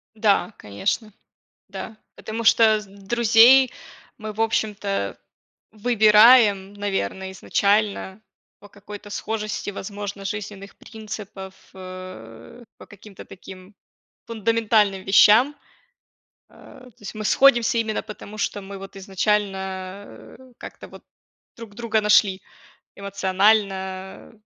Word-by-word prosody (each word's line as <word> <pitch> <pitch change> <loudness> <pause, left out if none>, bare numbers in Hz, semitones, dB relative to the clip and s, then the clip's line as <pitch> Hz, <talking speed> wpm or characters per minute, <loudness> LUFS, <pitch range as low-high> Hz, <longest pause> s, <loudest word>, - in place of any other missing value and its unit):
Да, 215 0 +1
конечно, 105 - -3 0.6
да. 220 - -8 0.2
Потому 225 +1 -6
что 225 - +5 0.2
с 210 - -13
друзей 235 +5 +4 0.5
мы, 215 -1 -7
в 215 - -8
общем-то, 205 - -2 0.6
выбираем, 215 -2 +5
наверное, 190 - -4
изначально 200 +1 -1 0.4
по 205 - -15
какой-то 205 0 -12
схожести, 215 0 -4
возможно, 200 0 -7
жизненных 200 0 -7
принципов, 210 -4 -9 0.2
э, 185 - -11
по - - -15
каким-то 205 -1 -14
таким 190 +1 -13 0.5
фундаментальным 220 -3 +1
вещам. 220 +8 +5 1.0
Э, 255 - -16
то 240 - -27
есть 205 - -9
мы 215 0 -6
сходимся 240 -2 +4
именно 220 -1 -2
потому, 215 -1 -11
что 205 -1 -3
мы 195 0 -9
вот 195 0 -11
изначально, 195 +1 -1 0.5
э, - - -15 0.2
как-то - - -11
вот - - -15 0.5
друг 230 -3 -11
друга 225 -1 -1
нашли 205 -2 +3 0.6
эмоционально. 195 -1 -1
205 Hz, 105 wpm, -22 LUFS, 195-220 Hz, 1.0 s, что